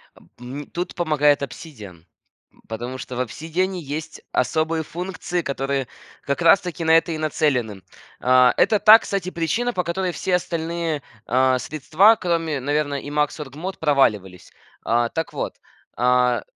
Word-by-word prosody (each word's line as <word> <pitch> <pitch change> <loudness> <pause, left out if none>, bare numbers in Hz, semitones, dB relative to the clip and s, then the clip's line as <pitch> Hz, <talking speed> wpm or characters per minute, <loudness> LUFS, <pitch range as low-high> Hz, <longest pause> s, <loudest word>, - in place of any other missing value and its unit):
А, - - -19 0.2
м 135 +4 -7
тут 175 +1 -4
помогает 150 -4 +2
"Обсидиан", 110 - -9 0.5
м, - - -26
потому 120 +3 -5
что 125 0 -7
в - - -2
"Обсидиане" 165 - -2
есть 150 +2 -6
особые 160 +5 0
функции, 175 +1 -4
которые 135 -2 -2 0.3
как 140 +5 -2
раз-таки 175 0 +3
на 160 0 +5
это 165 +1 +1
и 155 - -3
нацелены. 125 -10 -1 0.4
А, 125 0 +5
это 215 - +3
та, 215 +2 +9
кстати, 195 -4 -3
причина, 185 +9 -1
по 180 -4 -1
которой 180 +1 -2
все 185 - -2
остальные, 165 -3 -3 0.2
а, 130 +1 +3
средства, 155 - +3
кроме, 165 -5 -1
наверно, 145 +1 -1
Emacs 150 +1 -1
Org 135 -3 -8
Mode, 185 +4 -5
проваливались. 105 - 0 0.3
А, 120 +1 +2
так 165 +6 -4
вот, - - -4 0.4
а, 125 0 +2
150 Hz, 150 wpm, -22 LUFS, 130-170 Hz, 0.5 s, та